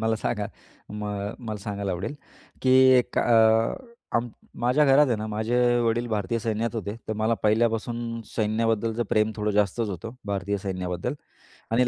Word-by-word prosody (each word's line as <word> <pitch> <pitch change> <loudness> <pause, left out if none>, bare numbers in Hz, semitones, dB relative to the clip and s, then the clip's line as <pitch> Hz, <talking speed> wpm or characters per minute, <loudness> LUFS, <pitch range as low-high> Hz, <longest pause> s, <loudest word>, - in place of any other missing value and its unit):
मला 110 0 +1
सांगा 105 -1 -2 0.5
मग 105 -1 -4
मला 110 -4 -5
सांगायला 100 -2 -3
आवडेल, 95 +11 -4 0.5
की 130 - +3 0.3
एक 125 - -1
अ, 115 - +2 0.4
माझ्या 125 +5 +3
घरात 140 +2 +6
आहे 120 - +1
ना 110 0 -4
माझे 110 +3 -1 0.3
वडील 115 +1 +1
भारतीय 105 0 -1
सैन्यात 115 +1 -2
होते, 105 -2 -3
तर - - 0
मला 110 +2 +1
पहिल्यापासून 115 +1 0
सैन्याबद्दलचं 115 +1 0
प्रेम 110 0 +2
थोडं 105 0 0
जास्तच 105 +2 +1
होतं. 100 +3 -5 0.2
भारतीय 100 0 -1
सैन्याबद्दल 90 +4 -3 0.6
आणि 125 +2 +3
110 Hz, 145 wpm, -25 LUFS, 105-115 Hz, 0.6 s, घरात